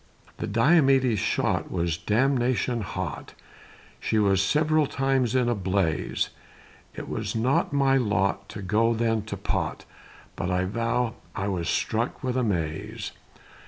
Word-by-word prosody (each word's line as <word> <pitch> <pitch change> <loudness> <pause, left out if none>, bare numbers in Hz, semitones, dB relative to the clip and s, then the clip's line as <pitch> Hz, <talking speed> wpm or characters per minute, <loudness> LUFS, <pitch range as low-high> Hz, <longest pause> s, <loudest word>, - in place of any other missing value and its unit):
The - - -3
Diomede's 130 - +4
shot 110 - 0
Was 85 -2 -1
damnation 125 +3 +1
hot, 100 - -5 0.6
She 110 - 0
was 100 -3 +3
several 155 +7 +2
times 135 -3 +1
in 125 -2 +3
a 120 - +2
blaze; 95 -5 -1 0.6
It - - -6
was - - -3
not 125 +5 +1
my 135 -1 +3
lot 100 -4 0
To 100 - -7
go 115 +4 +2
then 115 -1 +1
to 110 - -5
pot, - - -2 0.5
But 90 - -3
I 90 0 +1
veow, 115 +3 0 0.2
I 100 0 -2
was 90 -4 -2
struck 115 +4 -1
with 130 -1 -1
amaze. 85 -11 -2
115 Hz, 135 wpm, -26 LUFS, 100-130 Hz, 0.6 s, Diomede's